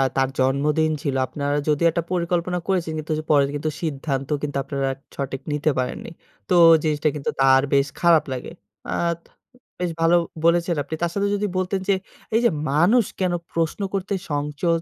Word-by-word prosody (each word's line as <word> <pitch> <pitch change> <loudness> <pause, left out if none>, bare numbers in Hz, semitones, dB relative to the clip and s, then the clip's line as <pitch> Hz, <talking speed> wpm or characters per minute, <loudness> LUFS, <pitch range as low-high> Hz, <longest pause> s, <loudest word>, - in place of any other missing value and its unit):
তার 135 -1 +2
জন্মদিন 145 +4 +2
ছিল। 140 -4 -1
আপনারা 145 +1 -2
যদি 150 +2 +1
একটা 170 +1 -1
পরিকল্পনা 175 0 0
করেছেন 180 -5 0
কিন্তু 155 +1 -3
যে, - - -5
পরে 145 -2 +5
কিন্তু 150 +2 -2
সিদ্ধান্ত 140 -4 -3
কিন্তু 145 -1 -2
আপনারা 135 -1 -2 0.3
সঠিক 135 -1 -4
নিতে 150 +1 +1
পারেননি। 125 - -3 0.4
তো - - +2 0.3
জিনিসটা 155 -1 0
কিন্তু 145 - -3
তার 135 0 +6
বেশ 140 0 +4
খারাপ 170 -2 +5
লাগে 125 - -6 0.4
আত 170 -1 0 0.6
বেশ 180 -1 -1
ভালো 165 +1 +5 0.3
বলেছেন 170 +1 +3
আপনি। 150 +3 -5
তার 170 -1 0
সাথে 200 0 +1
যদি 205 +1 -1
বলতেন, 185 +1 0
যে, - - +6 0.4
এইযে 235 +1 +4 0.2
মানুষ 190 - +4
কেনো 180 -2 +1 0.2
প্রশ্ন 165 +4 -1
করতে 195 +1 -2 0.2
সংচোদ 150 +3 0
160 Hz, 165 wpm, -23 LUFS, 140-175 Hz, 0.6 s, তার